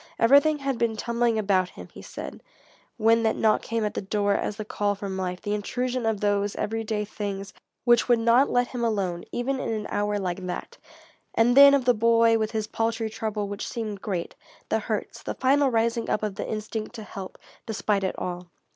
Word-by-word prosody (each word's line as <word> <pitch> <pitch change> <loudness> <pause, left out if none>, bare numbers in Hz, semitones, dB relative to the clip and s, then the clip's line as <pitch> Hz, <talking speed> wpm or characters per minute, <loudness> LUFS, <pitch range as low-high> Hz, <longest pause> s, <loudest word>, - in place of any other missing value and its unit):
Everything 285 +6 +5
had 275 -3 -2
been 230 -1 +1
tumbling 235 0 0
about 190 -3 +2
him, - - -11
he - - -10
said, - - -8 0.6
when 225 0 +4
that 220 -1 +1
knock 215 -1 +3
came 230 -1 -2
at 210 - -2
the - - -3
door 205 +1 0
as 205 - -1
the 215 -1 -6
call 205 -1 -1
from 195 -1 -5
life, 180 -1 -3
the 205 -1 -2
intrusion 245 +3 -2
of 220 -3 0
those 205 -1 +1
everyday 220 -1 -2
things 200 -1 -5 0.3
which 240 0 +4
would 240 - +6
not 235 +4 +4
let 245 0 +1
him 245 -2 -4
alone, 195 -6 -1
even 260 +2 -1
in - - -3
an 215 -1 -3
hour 205 0 0
like 185 -1 -3
that. 180 - -6 0.6
And 240 +2 +4
then 280 0 +9
of 265 -3 0
the 250 - +5
boy 230 0 +4
with 215 -1 0
his 220 -1 -2
paltry 225 0 -2
trouble 215 -2 -3
which 205 +1 -5
seemed 215 -4 -4
great 185 -5 -3 0.4
the - - +2
hurts - - -4
the - - -5
final 275 +1 +3
rising 230 0 0
up 215 - 0
of 210 -2 -1
the - - -5
instinct 215 +1 -4
to 220 - -7
help, 195 -2 -8 0.3
despite 210 -2 0
it 190 - -2
all. 180 0 -5
220 Hz, 205 wpm, -26 LUFS, 205-235 Hz, 0.6 s, then